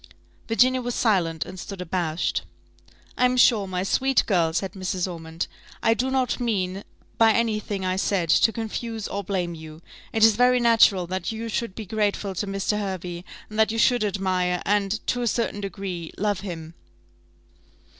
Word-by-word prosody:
Virginia 255 +3 +3
was 245 -1 -3
silent, 170 -8 +1
and 185 0 -9
stood 195 +1 -7
abashed. 175 -2 -1 0.8
"I 250 - +5
am 250 0 +2
sure, 220 -5 +5
my 185 -1 -2
sweet 265 +6 +2
girl," 170 -6 +2
said 190 +3 -2
Mrs. 185 -1 -2
Ormond, 165 -2 -5 0.4
"I 225 - +5
do 250 +3 -1
not 260 -2 0
mean, 195 -5 -1 0.4
by 225 -1 +6
any 225 -2 +1
thing 200 -2 -4
I 185 0 0
said, 190 -4 0
to 225 - +5
confuse 225 0 -4
or 200 0 -4
blame 180 -3 -2
you. 155 -1 -10 0.3
It 220 - +1
is 225 -2 +5
very 250 0 +4
natural 225 -6 +5
that 185 +2 -3
you 225 +1 -5
should 225 -3 -3
be 220 - -6
grateful 205 -1 -1
to 200 +3 -3
Mr. 195 +2 -1
Hervey, 180 -3 -4 0.2
and 215 0 -6
that 220 0 +4
you 225 - -3
should 245 0 +3
admire, 185 -3 0
and, 205 +1 0
to 245 - 0
a 240 - 0
certain 225 -2 -1
degree, 190 -4 -5
love 205 -1 0
him." 165 -5 -7
200 Hz, 175 wpm, -24 LUFS, 180-225 Hz, 0.8 s, by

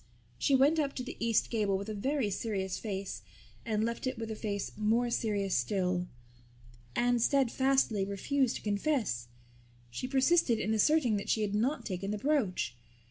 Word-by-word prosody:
She 275 - +3
went 285 +5 +4
up 280 -2 -1
to 255 - -3
the 250 - -7
east 230 -1 +1
gable 205 -4 +1
with 200 +2 -6
a 215 - -3
very 250 +1 -1
serious 190 -2 -2
face 200 -3 -4 0.4
and 215 -2 0
left 235 +3 -2
it 255 -1 -2
with 225 0 -4
a - - -3
face 205 -2 -3
more 230 +3 +1
serious 205 -5 0
still. 180 -3 0 0.9
Anne 245 0 +2
steadfastly 265 -4 +2
refused 230 +7 0
to - - -7
confess. 205 - 0 0.6
She 190 - -4
persisted 265 -1 +3
in 215 +1 -1
asserting 245 0 +3
that 200 - -5
she 220 - +2
had 205 -1 -2
not 250 +9 0
taken 195 -1 -3
the 210 - -1
brooch. 210 - 0
220 Hz, 170 wpm, -31 LUFS, 200-260 Hz, 0.9 s, went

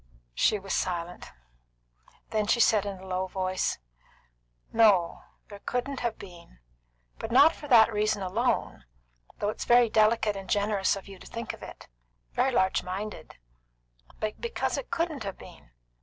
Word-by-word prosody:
She 210 - +2
was 195 -1 -5
silent. 175 -1 -3 1.0
Then 215 -1 0
she 235 - +2
said, 210 -3 +4
in 195 -1 -5
a - - -11
low 185 0 -2
voice: 185 0 -1 1.0
"No, 205 -7 +4 0.3
there 205 -1 -11
couldn't 255 +5 -3
have 235 -2 -2
been. 175 - -13 0.6
But 225 - -5
not 285 +6 +7
for 295 - -10
that 230 -4 +6
reason 210 -1 0
alone, 200 - -1 0.5
though 205 - -1
it's - - -5
very 240 -2 +5
delicate 215 -1 +3
and 195 -1 -8
generous 205 -2 +1
of 195 - -9
you 195 -2 -11
to - - -13
think 230 0 -5
of - - -12
it, - - -11 0.5
very 270 - +2
large 190 -6 +2
minded; 200 +4 -6 0.8
but 215 0 -4
because 470 0 -2
it - - -5
couldn't 335 -5 -2
have 195 -2 -5
been. - - -14
210 Hz, 155 wpm, -28 LUFS, 190-235 Hz, 1.0 s, not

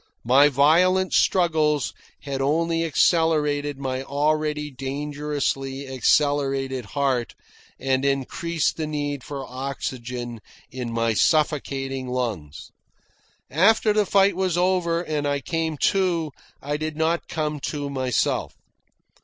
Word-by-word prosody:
My 135 +5 +6
violent 175 +7 +3
struggles 155 -5 +2 0.3
had 135 -1 -4
only 165 +4 +1
accelerated 150 -3 +2
my 130 -1 -3
already 150 +2 -1
dangerously 140 0 -3
accelerated 135 -1 +1
heart, 130 -5 0 0.4
and 130 0 0
increased 140 +4 -1
the 160 -1 -2
need 145 -3 -3
for 140 -2 -6
oxygen 125 -2 -5 0.3
in 125 -2 -5
my 115 0 +1
suffocating 135 - 0
lungs. 110 - -4 0.8
After 210 +7 +4
the 210 -2 +2
fight 195 0 +4
was 185 -2 0
over 175 -2 +1
and 150 -3 -2
I 145 0 0
came 160 0 -2 0.2
to, 175 -5 0 0.3
I 145 +1 -2
did 155 0 -4
not 165 +2 0
come 155 -3 -2
to 145 0 -4
myself. 130 -3 -1
145 Hz, 110 wpm, -24 LUFS, 135-160 Hz, 0.8 s, My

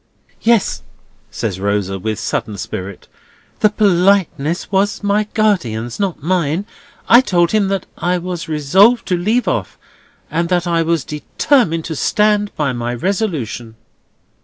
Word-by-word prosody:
"Yes," 230 -3 +2 0.5
says 100 -5 -4
Rosa, 100 -1 -1
with 110 +2 -3
sudden 110 -2 -3
spirit, 95 +1 -6 0.5
"The 215 - +4
politeness 185 -5 +1
was 200 +2 0
my 205 +1 +1
guardian's, 120 - 0
not 190 -7 -2
mine. 175 +1 0 0.4
I 240 +2 +8
told 175 -8 +1
him 215 -2 +2
that 195 -1 -2
I 180 +1 +1
was 175 -2 -5
resolved 190 - +4
to 180 - +2
leave 215 +8 0
off, - - -2 0.5
and 170 +1 -1
that 180 -1 +1
I 170 -1 +1
was 165 -3 0
determined 165 - 0
to 160 - -4
stand 210 +5 +1
by 145 -4 -1
my 120 0 -3
resolution." 135 - -3
175 Hz, 135 wpm, -17 LUFS, 135-200 Hz, 0.5 s, I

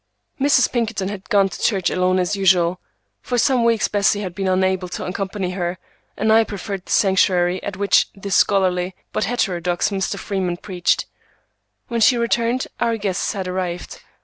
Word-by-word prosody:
Mrs. 270 -2 +3
Pinkerton 225 -5 -1
had 200 -1 -8
gone 200 -3 +4
to - - -9
church 195 -6 +1
alone 185 0 +1
as 185 +2 0
usual. 180 -2 +2 0.4
For 245 - -2
some 245 0 +3
weeks 230 -2 +2
Bessie 205 0 +1
had 185 -3 -5
been 195 +1 -3
unable 185 0 +1
to 175 - -5
accompany 190 0 -3
her, 180 -1 -3 0.4
and 220 +1 +2
I 225 +1 +6
preferred 200 -2 -6
the - - -7
sanctuary 185 -2 +2
at 200 -1 -5
which 200 0 +3
the 200 0 -7
scholarly, 185 -2 +2 0.2
but - - 0
heterodox, 180 -6 -1
Mr. 190 -1 -2
Freeman 185 -3 -2
preached. 180 -2 -1 0.8
When 235 -1 -2
she 240 +3 +5
returned, 235 +2 0
our 230 -1 +1
guests 200 -3 -2
had 190 -3 -4
arrived. 180 -1 -4
195 Hz, 170 wpm, -20 LUFS, 180-215 Hz, 0.8 s, I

